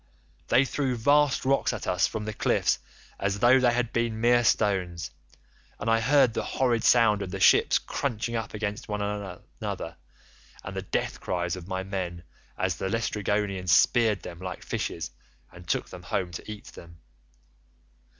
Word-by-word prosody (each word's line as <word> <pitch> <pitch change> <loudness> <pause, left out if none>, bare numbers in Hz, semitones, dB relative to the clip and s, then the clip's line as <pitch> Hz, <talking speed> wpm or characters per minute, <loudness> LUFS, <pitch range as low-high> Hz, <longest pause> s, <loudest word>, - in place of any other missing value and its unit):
They 130 - +4
threw 135 -2 -1
vast 145 +3 +3
rocks 135 -1 +2
at 115 - -5
us 90 +2 +2
from 110 -1 -5
the 110 - -4
cliffs - - +1 0.4
as 100 0 0
though 120 +5 +5
they 125 -1 +4
had 120 -1 -1
been 115 -2 0
mere 120 +1 +4
stones, 95 -7 +1 0.7
and 115 - 0
I 115 - +4
heard 135 0 +4
the - - -1
horrid 120 -4 0
sound 115 -5 +5
of 95 - -4
the 95 +1 -5
ships - - +5
crunching 115 -3 -3
up 110 -1 -4
against 105 +3 -4
one 105 -1 -2
another, 100 -3 -5 0.7
and - - -7
the - - -2
death - - -2
cries 90 -1 -2
of 90 -1 -9
my 95 -1 -3
men, 90 -3 -4 0.3
as 95 -3 -1
the 95 - -2
Laestrygonians 105 -3 -1
speared 110 +2 +4
them 85 -1 -8
like 90 -1 -6
fishes - - -4 0.4
and 85 -1 -14
took - - -1
them - - -9
home 90 -2 -2
to 85 +5 -7
eat 105 -1 -9
them. 85 0 -13
105 Hz, 170 wpm, -27 LUFS, 95-120 Hz, 0.7 s, though